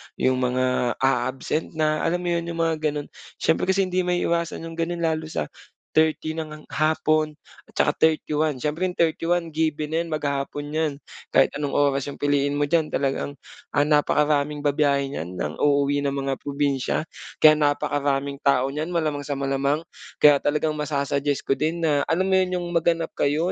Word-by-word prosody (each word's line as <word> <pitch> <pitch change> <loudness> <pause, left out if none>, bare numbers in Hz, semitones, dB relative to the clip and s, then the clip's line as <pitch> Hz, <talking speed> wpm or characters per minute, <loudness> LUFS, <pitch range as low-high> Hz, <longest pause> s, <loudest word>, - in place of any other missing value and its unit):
'yung 130 0 +1
mga 125 -1 +1
aabsent 135 +5 0
na, 155 -1 +1
alam 175 +2 -1
mo 175 - -1
'yun, 170 0 -1
'yung 170 -1 -5
mga 165 -1 +1
gano'n. 150 -2 -2 0.3
Siyempre 160 - +1
kasi 190 +1 +3
hindi 185 -1 -1
maiiwasan 170 -2 0
'yung 165 0 -8
gano'n 170 +1 -2
lalo 160 -1 0
sa 75 - -4 0.4
30 155 0 +2
nang 155 -1 -6
hapon 155 0 +1 0.3
at - - -23
saka - - +3
31 155 -1 +2
siyempre 155 +5 0
31 170 +1 0
given 155 -1 -1
na 160 - +1
'yan, 170 - -2
maghapon 145 -1 -3
'yan. 155 -2 0 0.4
Kahit - - +5
anong 145 -2 -2
oras 140 -1 +2
'yong 145 - -5
piliin 145 0 +1
mo 145 - +1
diyan 155 +1 +2
talagang, 140 +1 -2 0.4
ah, 145 - +4
napakaraming 150 0 +2
babiyahe 140 -1 +1
niyan 90 - -5
nang 75 -3 -4
uuwi 145 0 +2
ng 140 -1 -1
mga 135 -1 -2
probinsya. 140 -1 -1 0.4
Kaya 155 0 +8
napakaraming 145 -1 0
tao 135 -1 +2
niyan, 150 +3 -3
malamang 155 -5 -2
sa 145 - -2
malamang. 140 +2 0 0.3
Kaya 145 -1 +6
talagang 150 +2 0
masa-suggest 140 -1 -1
ko 135 - 0
din 165 +2 -1
na 145 -3 +2
alam 170 +3 +1
mo 190 0 +3
'yun, 185 -1 0
'yung 175 -1 -2
maghanap 165 -1 +1
kayo 155 +5 0
150 Hz, 170 wpm, -24 LUFS, 140-160 Hz, 0.4 s, Kaya